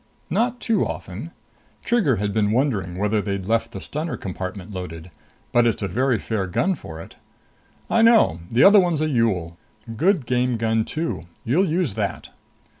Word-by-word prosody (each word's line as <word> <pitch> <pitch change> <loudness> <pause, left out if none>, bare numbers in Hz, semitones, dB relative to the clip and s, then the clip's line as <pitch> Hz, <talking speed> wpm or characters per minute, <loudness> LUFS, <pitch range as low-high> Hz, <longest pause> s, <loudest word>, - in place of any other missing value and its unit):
"Not 245 +2 +1
too 220 -4 +1
often." 100 - -6 0.6
Trigger 210 - +2
had 100 0 -2
been 105 -2 +2
wondering 105 -8 0
whether 105 +2 +1
they'd 100 -2 -3
left 115 +2 0
the - - -6
stunner 155 +2 -4
compartment 95 +1 -6
loaded. 90 -2 -7 0.4
"But 120 0 +4
it's 110 -2 -1
a - - 0
very 125 +6 +1
fair 100 -2 -2
gun 190 - +1
for 80 - -9
it." 85 - -11 0.7
"I 230 - +2
know. 225 - +5
The 120 +3 +3
other 205 +1 +8
one's 175 -5 +1
a 155 - +1
Yool. 95 - 0 0.4
Good 170 - +2
game 125 0 +1
gun, 110 0 +1
too. 155 - -3 0.2
You'll 170 - +2
use 165 - 0
that." 100 -3 -3
115 Hz, 170 wpm, -23 LUFS, 95-155 Hz, 0.7 s, other